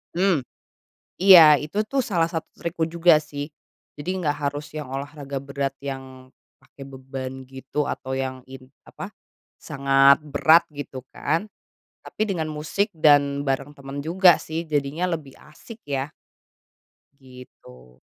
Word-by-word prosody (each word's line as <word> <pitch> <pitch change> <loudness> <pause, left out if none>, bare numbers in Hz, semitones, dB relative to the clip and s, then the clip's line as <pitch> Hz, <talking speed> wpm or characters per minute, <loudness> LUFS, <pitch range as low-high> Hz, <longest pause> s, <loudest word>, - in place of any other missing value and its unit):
Mmm, 185 -4 +2 0.8
iya 165 -6 +9
itu, 150 +7 -6
tuh, 270 +2 0
salah 170 -6 +1
satu 165 -1 -5
trikku 170 -1 -3
juga, 170 -1 +5
sih. 145 -1 -6 0.5
jadi 180 +6 -4
enggak 145 -5 -1
harus 145 +1 -7
yang 150 -4 -6
olahraga 140 0 -6
berat 140 0 -4
yang 130 -1 -9 0.2
pakai 140 - -19
beban 130 -1 -8
gitu 135 +2 -4
atau 130 0 -4
yang 130 -1 -4
in 130 -1 -11 0.2
apa, - - -10 0.5
sangat 135 +1 +4
berat 155 +3 +4
gitu, 130 -2 -8
kan, 165 +8 -1 0.6
tapi - - -5
dengan 165 -6 -2
musik 155 +8 -2
dan 145 -2 +4
bareng 135 +1 -1
temen 140 +1 -7
juga, 175 +2 +5
sih, 160 +1 -5
jadinya 150 +4 -1
lebih 145 -5 -9 0.2
asik, 230 +8 -13
ya. 140 0 -3 1.1
Gitu. 65 - -16
145 Hz, 130 wpm, -23 LUFS, 135-160 Hz, 1.1 s, iya